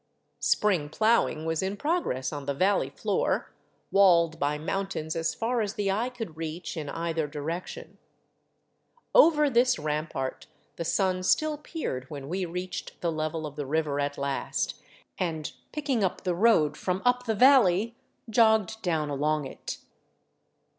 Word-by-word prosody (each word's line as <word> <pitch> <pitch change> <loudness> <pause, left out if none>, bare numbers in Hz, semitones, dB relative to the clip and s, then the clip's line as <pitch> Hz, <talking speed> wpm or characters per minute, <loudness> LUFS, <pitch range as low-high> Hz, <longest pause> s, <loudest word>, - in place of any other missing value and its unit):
Spring 180 -9 +2
plowing 215 -5 +2
was 160 -1 0
in 190 +2 -2
progress 290 - -1
on 145 -1 -6
the 140 - -1
valley 195 +7 +2
floor, - - -1 0.4
walled 170 -5 +5
by 145 +1 0
mountains 160 -1 -3
as 165 0 -1
far 235 +1 0
as 205 -1 -2
the 200 -2 0
eye 225 +6 0
could 225 -10 -7
reach 165 +3 -5
in 150 -3 -4
either 165 -1 -2
direction. 155 +4 -6 1.1
Over 320 -11 +6
this 250 -1 +3
rampart 150 -3 -3 0.3
the 170 - -4
sun 185 +1 +1
still 310 +11 +2
peered 290 - -5
when 140 -2 -7
we 185 +2 -1
reached 180 +2 -6
the 170 - 0
level 155 0 -2
of 145 -1 -7
the 145 -1 -4
river 150 -1 0
at 145 0 -1
last 140 0 -2 0.5
and, 160 -4 -2 0.2
picking 275 -7 -1
up 185 - -1
the 180 - 0
road 170 -7 +4
from 185 +3 -2
up 250 0 +2
the 220 -2 0
valley, 230 -3 +5 0.3
jogged 220 -2 +3
down 155 -4 -1
along 150 +1 0
it. - - -6
175 Hz, 150 wpm, -28 LUFS, 155-220 Hz, 1.1 s, Over